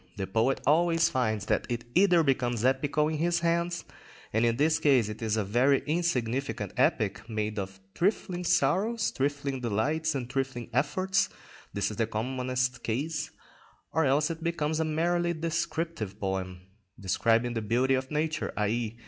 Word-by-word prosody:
The 95 - -2
poet 115 +7 +1
always 165 +3 +4
finds 110 -5 0
that - - 0
it 120 -1 -2
either 180 -2 +5
becomes 120 -4 0
epical 140 +3 +2
in 155 -1 -2
his 170 +1 +1
hands, 170 +1 0 0.5
and 110 +2 +2
in 115 -1 +2
this 155 +3 +3
case 130 -7 +3
it 105 +2 -7
is 110 -1 0
a 110 - +1
very 125 +7 +2
insignificant 135 -6 -1
epic, - - +1
made 110 -1 -2
up 95 -1 -3
of 95 0 -20
trifling 180 - 0
sorrows, 195 +10 +2
trifling 140 -1 -2
delights, 145 +8 0
and 125 -3 -3
trifling 130 -2 -3
efforts—this 150 - -1
is 105 - -8
the 115 -2 +1
commonest 125 +2 -2
case—or 150 +4 -4
else 145 +4 +2
it 165 0 -7
becomes 160 -2 -1
a 160 - +1
merely 170 +2 +1
descriptive 160 - -3
poem, 95 -2 -3 0.4
describing 115 +5 +1
the 115 - -2
beauty 125 +5 +2
of 130 0 -1
nature, 155 0 -1
_i.e. 110 +2 -1
135 Hz, 155 wpm, -28 LUFS, 115-160 Hz, 0.5 s, either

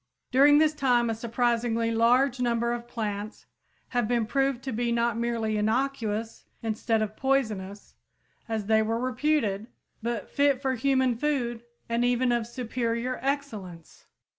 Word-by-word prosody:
During 285 +3 +6
this 310 0 +4
time 245 -5 +2
a - - 0
surprisingly 230 0 0
large 245 +3 +3
number 235 -1 +1
of 240 0 -5
plants 215 -2 -5 0.4
have 245 -3 0
been 235 -1 +1
proved 270 +1 0
to 265 - -3
be 235 +1 -1
not 235 -1 +1
merely 230 -2 -1
innocuous 225 -1 -1 0.2
instead 225 0 0
of 215 0 -5
poisonous, 215 -8 -1 0.6
as 220 -2 -2
they 220 +1 +4
were 225 +1 0
reputed, 255 -5 0 0.3
but 235 -1 -3
fit 280 -2 +2
for 265 -1 0
human 260 -1 +2
food 240 -3 -1 0.3
and 235 +1 0
even 245 0 +2
of 235 -2 0
superior 240 0 -2
excellence! 220 - -5
235 Hz, 140 wpm, -27 LUFS, 225-255 Hz, 0.6 s, During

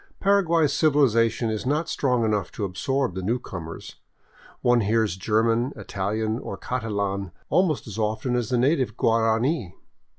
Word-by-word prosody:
Paraguay's 170 -6 +3
civilization 115 -7 +2
is 110 - -3
not 150 +5 0
strong 125 -7 +1
enough 105 -4 -1
to 105 - -3
absorb 130 +5 -1
the 95 - -4
newcomers; 95 -6 -5 0.7
one 120 -1 +4
hears 110 -2 +1
German, 115 +6 +1
Italian, 110 +2 -2
or 100 - -6
Catalan 100 -6 -2 0.2
almost 180 -6 +2
as 110 -1 -7
often 110 +3 -1
as 120 -2 -1
the 125 - +1
native 130 -3 +1
Guarani. 115 - +1
115 Hz, 135 wpm, -24 LUFS, 105-130 Hz, 0.7 s, one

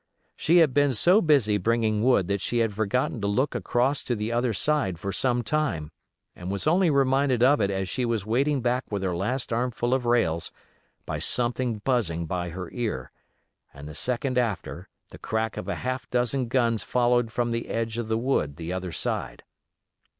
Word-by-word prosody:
She 170 +4 +3
had 160 -6 +5
been 145 -2 +3
so 180 - +5
busy 125 -10 +3
bringing 110 0 +1
wood 120 -8 +3
that 100 0 -1
she 120 - -1
had 115 -3 +1
forgotten 110 +3 -1
to 100 - 0
look 130 +8 +1
across 130 +4 0
to 120 - 0
the 105 +1 -3
other 120 +1 +1
side 110 - 0
for 100 +3 -4
some 120 +2 +1
time, 105 - -1 0.4
and 90 +1 -7
was 100 0 -3
only 175 +3 +4
reminded 135 -3 +2
of 140 0 +5
it 100 - +2
as 95 -1 -2
she 125 - -2
was 115 -4 -1
wading 135 +5 +1
back 125 0 -1
with 100 -2 -2
her 90 -2 -1
last 120 +7 -2
armful 120 +1 0
of 130 -2 0
rails 85 -9 +1 0.5
by - - -3
something 120 -3 0
buzzing 90 -11 0
by 90 +1 -3
her 90 0 -7
ear, 110 - -3 0.6
and 70 +1 -9
the 75 - -8
second 125 - -1
after 110 -7 -3 0.2
the - - -12
crack 110 0 -2
of - - -6
a - - -2
half 130 0 -3
dozen 125 +1 0
guns 115 -2 +1
followed 120 -2 +1
from 120 +1 -1
the 115 0 -3
edge 115 0 -2
of 115 - -3
the 110 0 0
wood 115 - 0
the 85 +3 -5
other 95 -1 -4
side. - - -3
120 Hz, 195 wpm, -26 LUFS, 100-130 Hz, 0.6 s, had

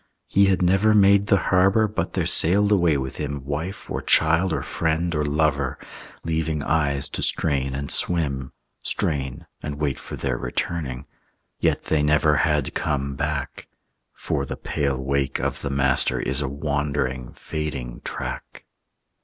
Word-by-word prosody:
He 100 +1 +3
had 95 -1 +2
never 95 +4 +4
made 100 0 +5
the 100 - +4
Harbor 95 +4 +4
But 105 - -3
there - - 0
sailed 100 +5 +5
away 85 -7 +3
with 65 -1 -5
him 70 -2 -4
Wife 80 +7 -4
or - - -2
child 85 +4 +3
or - - -1
friend 85 +1 -1
or 75 -1 0
lover, 75 -3 0 0.5
Leaving 80 -2 -1
eyes 70 -3 +1
to - - -4
strain 70 -4 0
and 70 +1 -3
swim, 70 -7 +1 0.3
Strain 70 +2 -2 0.2
and 75 -1 -4
wait 75 -2 -2
for - - -6
their 65 -3 -2
returning; 70 -6 -3 0.5
Yet - - +1
they 80 -2 +1
never 75 0 +3
had 75 -5 +1
come 70 -2 -1
back; 75 +1 -4 0.4
For - - -3
the - - -5
pale 70 -2 -2
wake 70 0 -1
of - - -2
the - - -3
Master 65 -1 +2
Is 70 +2 -1
a 70 - -2
wandering, 70 -3 -2
fading 70 -6 -5
track. - - -6
75 Hz, 155 wpm, -23 LUFS, 70-85 Hz, 0.5 s, made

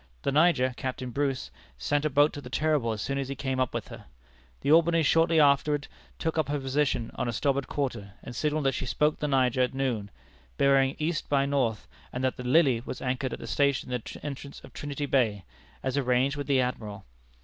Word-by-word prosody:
The - - +1
Niger, 145 -4 +3
Captain 130 -1 -4
Bruce, 135 -1 -2 0.3
sent 145 +1 0
a - - +2
boat 145 +2 +4
to 145 - -6
the 125 - -10
Terrible 150 -4 +1
as 105 -1 -3
soon 140 0 -2
as 135 -1 -3
he 140 - -3
came 130 -2 -2
up 130 -2 +1
with - - -5
her. - - -10 0.6
The 145 - +1
Albany 165 0 +5
shortly 165 +2 +4
afterward 145 0 +3 0.3
took 160 0 -1
up 155 - 0
her 145 0 0
position 135 -3 0
on - - -2
our - - 0
starboard 140 +3 0
quarter, 115 -9 -3
and 120 - -8
signalled 150 +1 0
that 135 - +4
she 130 - -4
spoke 150 +4 +1
the 150 - -1
Niger 130 -2 +2
at 125 +1 0
noon, 120 -7 -1 0.5
bearing 135 0 +3
E. 155 +3 0 0.2
by 140 -1 +3
N., 140 +1 -2 0.6
and 125 - -4
that 130 - +1
the 125 - -7
Lily 130 -2 +4
was 130 - -6
anchored 130 0 -2
at - - -4
the - - -7
station 140 -3 +1
in 125 -1 -1
the - - -9
entrance 140 -1 -6
of - - -13
Trinity 145 0 -4
Bay, 115 -8 +1 0.4
as 130 +1 -1
arranged 130 +1 +2
with 145 -1 -5
the 140 -2 +3
Admiral. 105 -5 -4
135 Hz, 215 wpm, -28 LUFS, 125-145 Hz, 0.6 s, Albany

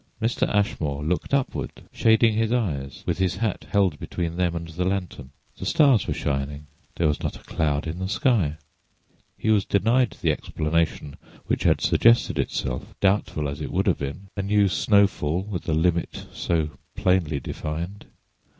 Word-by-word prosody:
Mr. 115 +1 0
Ashmore 75 -8 0
looked 85 +4 -1
upward, 140 -2 -1
shading 110 0 +4
his 110 +1 +1
eyes 70 - -2
with - - -1
his 95 -2 +1
hat 110 -4 -2
held 95 -7 +2
between 85 -1 -3
them 90 -1 0
and 85 0 -4
the 85 +3 -2
lantern. 90 -8 -3 0.3
The - - -4
stars 135 - +4
were - - 0
shining; 70 +1 -2 0.3
there 85 - +2
was 75 - 0
not - - -3
a - - -13
cloud 75 -2 -1
in 80 +2 -4
the 95 0 -3
sky; 100 - +1 0.8
he 110 - +1
was 105 -2 +4
denied 115 +6 +2
the - - +2
explanation 75 -2 -1 0.3
which - - -1
had - - +4
suggested 115 +1 +4
itself, 65 -1 -3
doubtful 95 -6 +1
as 70 +2 -5
it 75 - -4
would - - +1
have - - +2
been—a 95 +8 -5
new 100 +1 +3
snowfall 95 -5 +2
with 95 -5 -5
a - - +2
limit 85 +1 0
so 80 -3 0 0.2
plainly 90 -7 +1
defined. 85 +8 -5
90 Hz, 165 wpm, -24 LUFS, 75-105 Hz, 0.8 s, shading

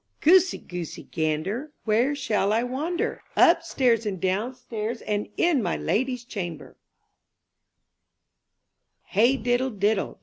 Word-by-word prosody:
^OOSEY, 370 +3 +4
Goosey, 175 -3 -6
Gander, 160 - -2
^^ - - -31
Where 235 +6 +2
shall 210 -7 0
I 225 +2 +2
wander? 295 +8 -2
Upstairs 265 -9 +3
and 190 -3 -3
downstairs. 230 +4 -3
And 210 0 -2
in 335 -7 +3
my 175 -5 -1
lady*s 250 +1 -1
chamber 175 -9 -6 2.4
H - - -9
EY 240 +5 +5
diddle 245 +2 0
diddle. 205 -2 -1
230 Hz, 115 wpm, -25 LUFS, 205-265 Hz, 2.4 s, EY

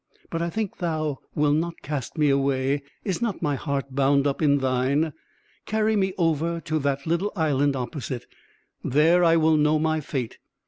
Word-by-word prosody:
"But 165 - -2
I 170 - -1
think 215 +2 -3
thou 155 -5 -2 0.2
wilt 150 0 +3
not 165 +1 -3
cast 140 0 -4
me 150 -2 +3
away; 135 0 +1 0.2
is 190 -1 -2
not 225 -6 -2
my 145 -2 +1
heart 140 -1 -3
bound 140 +1 +3
up 140 +1 0
in 145 -2 +4
thine? 135 +4 +1 0.5
Carry 220 0 +1
me 190 -2 +1
over 165 -1 +1
to 155 -1 -1
that 140 -1 -1
little 170 +5 0
island 145 -4 +1
opposite. 130 0 -4 0.6
There 160 +6 +4
I 165 -1 +5
will 160 -1 +4
know 150 +1 +3
my 155 0 +1
fate. 130 -5 -4
150 Hz, 175 wpm, -25 LUFS, 140-165 Hz, 0.6 s, I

